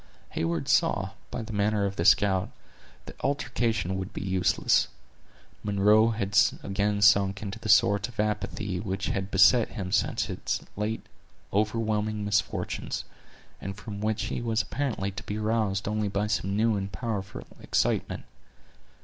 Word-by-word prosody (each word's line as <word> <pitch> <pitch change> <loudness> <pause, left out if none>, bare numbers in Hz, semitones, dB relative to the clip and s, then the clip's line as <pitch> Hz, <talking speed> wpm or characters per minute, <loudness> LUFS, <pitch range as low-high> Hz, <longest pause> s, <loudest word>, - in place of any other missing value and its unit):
Heyward 80 -3 -2
saw, - - +2 0.2
by 120 - -4
the 110 0 -7
manner 105 0 +1
of 100 0 -2
the 85 - -1
scout, 95 -2 +4 0.6
that - - -12
altercation 115 -8 0
would 95 +3 -6
be - - -5
useless. 95 -1 +2 0.8
Munro 105 +2 +4
had 105 -3 -2 0.3
again 100 +1 0
sunk 100 0 +4
into 105 +2 -5
that 110 -1 -6
sort 100 +1 +4
of 120 -3 -15
apathy 105 -2 -1
which 95 0 -3
had 95 0 -2
beset 95 +5 +5
him 95 -5 -6
since - - +1
his - - -3
late 105 +2 -3 0.5
overwhelming 110 0 0
misfortunes, 105 +1 -1 0.6
and 95 0 -5
from 105 -1 -7
which 110 +1 0
he - - -3
was 115 -2 0
apparently 115 -6 -2
to 95 - -7
be 105 - -4
roused 105 -3 0
only 105 0 0
by 100 +1 -1
some 100 -2 -1
new 110 0 +3
and 100 0 -3
powerful 100 +1 -4
excitement. - - 0
105 Hz, 150 wpm, -27 LUFS, 95-110 Hz, 0.8 s, beset